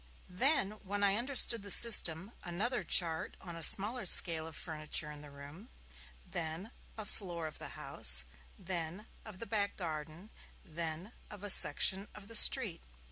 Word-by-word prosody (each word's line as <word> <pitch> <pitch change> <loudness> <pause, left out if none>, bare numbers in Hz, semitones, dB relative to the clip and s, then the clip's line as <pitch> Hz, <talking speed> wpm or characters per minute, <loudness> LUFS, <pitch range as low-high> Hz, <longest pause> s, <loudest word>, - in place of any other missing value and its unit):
Then, 260 +2 +2
when 205 +1 -5
I 200 -1 +1
understood 240 -1 +1
the 200 - -11
system, 195 -4 +3
another 205 +9 -3
chart 165 -3 +2
on 170 -2 -10
a 165 - -10
smaller 210 +4 +2
scale 165 -2 +3
of 160 - -11
the - - -7
furniture 155 -2 -4
in 145 -1 -13
the 150 - -14
room, 145 - -15 0.6
then 165 +6 -8 0.3
of 215 - -7
a - - -15
floor 175 -5 -7
of 155 - -10
the - - -9
house, 60 0 +2 0.3
then 180 +1 -7 0.2
of 215 -4 -12
the 230 - -9
back 205 -3 -3
garden, 160 +3 -9 0.3
then 165 +3 -8 0.2
of 205 -1 -13
a 205 - +2
section 190 +5 +3
of 205 -1 -13
the 230 - -6
street. - - +5
180 Hz, 170 wpm, -31 LUFS, 160-210 Hz, 0.6 s, street